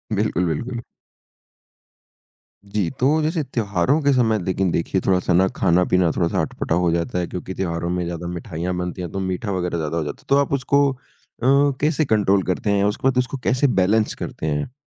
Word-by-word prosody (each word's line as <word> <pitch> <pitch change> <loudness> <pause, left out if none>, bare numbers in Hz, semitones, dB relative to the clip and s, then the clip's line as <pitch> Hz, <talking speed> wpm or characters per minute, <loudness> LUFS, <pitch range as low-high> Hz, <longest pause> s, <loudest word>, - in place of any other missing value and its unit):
बिल्कुल, 100 -3 0
बिल्कुल। 120 - -3 1.8
जी, 100 -3 -1
तो 145 +5 +3
जैसे 160 +2 0
त्योहारों 115 - 0
के 140 -1 +3
समय 115 -4 +2
लेकिन 95 +1 0
देखिए 90 +3 0
थोड़ा-सा 90 -1 +2
ना 95 +2 +4
खाना-पीना 90 -1 +3
थोड़ा-सा 85 -2 +1
अटपटा 80 - -2
हो 85 - +2
जाता 85 +1 -1
है 90 - -2
क्योंकि 90 +1 -6
त्योहारों 85 -2 -2
में 90 0 -1
ज़्यादा 85 0 -5
मिठाइयाँ 85 0 -4
बनती 90 0 -4
है, 90 - -3
तो 95 - -4
मीठा 95 +2 -2
वगैरह 90 -2 -1
ज़्यादा 80 0 -2
हो 80 - 0
जाता 75 - -6
है। - - -29
तो 140 - +5
आप 140 - -5
उसको 140 +1 +3
अ, 125 -2 -21 0.4
कैसे 155 +1 +2
कंट्रोल 100 -5 +2
करते 95 +3 -1
हैं, 100 -1 +2
उसको 105 +5 0
बाद 130 -1 +1
उसको 125 +2 0
कैसे 130 +3 +2
बैलेंस 105 -1 +2
करते - - -6
हैं? 75 - -2
95 Hz, 190 wpm, -22 LUFS, 90-125 Hz, 1.8 s, तो